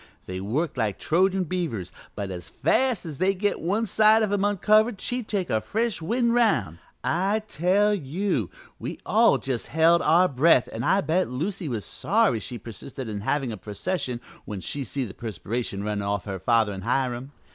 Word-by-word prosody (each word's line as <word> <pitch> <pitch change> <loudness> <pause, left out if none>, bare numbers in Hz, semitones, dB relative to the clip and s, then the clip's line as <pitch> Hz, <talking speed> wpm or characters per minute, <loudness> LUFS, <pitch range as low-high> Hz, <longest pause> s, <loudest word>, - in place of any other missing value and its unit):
They 95 0 -5
worked 135 - -2
like 110 -5 0
Trojan 185 +3 +2
beavers, 155 - -3 0.2
but 100 -2 -4
as 90 -1 -7
fast 255 -8 +1
as 155 -3 -7
they'd 190 +1 +2
get 205 +2 0
one 205 +7 0
side 220 +2 +5
of 210 - 0
him 200 -1 +1
uncovered 210 +2 +3
she'd 245 -3 -3
take 195 -4 -2
a 110 - +2
fresh 225 - -1
wind 235 +7 +1
round. 130 - +2 0.2
I 195 +6 +1
tell 200 +4 +2
you, 165 - -1 0.3
we - - -5
all - - +4
just 130 -3 -3
held 165 +2 +4
our 175 +4 +5
breath, 140 -2 +4
and 115 - -3
I 195 +8 +3
bet 180 +1 +1
Lucy 165 +6 -3
was 115 -5 -3
sorry 210 - +1
she 120 +4 -6
persisted 120 +4 -8
in 105 -2 -4
havin' 135 +3 0
a 110 - -5
procession 125 - -3 0.2
when 105 -2 -6
she 135 - -4
see 135 +1 -2
the 100 - -8
perspiration 110 -1 -4
runnin' 105 -1 -2
off 100 -1 -2
her 95 -2 -4
father 110 +1 +2
an' 95 - -6
Hiram. 125 +3 -1
150 Hz, 185 wpm, -25 LUFS, -, 0.3 s, side